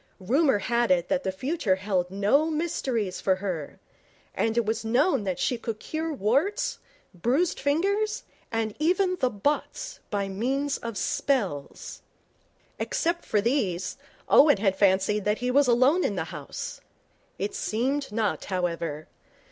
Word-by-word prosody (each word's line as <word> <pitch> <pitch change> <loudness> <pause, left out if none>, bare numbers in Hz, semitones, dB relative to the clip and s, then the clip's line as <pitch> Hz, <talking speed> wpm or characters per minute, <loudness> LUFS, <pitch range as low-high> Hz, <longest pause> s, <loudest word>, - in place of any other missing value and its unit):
Rumour 265 - +3
had 235 +3 0
it 175 -1 +2
that 275 -1 +1
the 190 - -1
future 235 - 0
held 190 -2 -1
no 210 - +2
mysteries 260 - -2
for 190 - +3
her, 185 -6 -5 0.5
and 225 +1 0
it 235 - +3
was 220 +1 -1
known 240 - +2
that 185 -2 -1
she 245 +5 0
could 225 -2 -4
cure 320 +5 -3
warts, 310 - 0 0.3
bruised 255 - +1
fingers, 400 - 0 0.3
and 225 -2 -1
even 365 +3 +2
the 255 -6 +1
botts 295 - -2
by 200 -2 -1
means 265 +9 -1
of 230 -3 -5
spells. 195 - -2 0.8
Except 340 +1 -1
for 210 - +1
these, 200 -7 0 0.3
Owen 290 -5 +6
had 195 -1 +1
fancied 195 +1 +2
that 210 +1 +2
he 250 0 -1
was 280 +1 +4
alone 260 +9 +4
in - - 0
the - - -1
house. - - -6 0.6
It 200 +2 -3
seemed 265 +5 -1
not, 215 -1 -1
however. 170 -5 -2
230 Hz, 145 wpm, -26 LUFS, 195-290 Hz, 0.8 s, Owen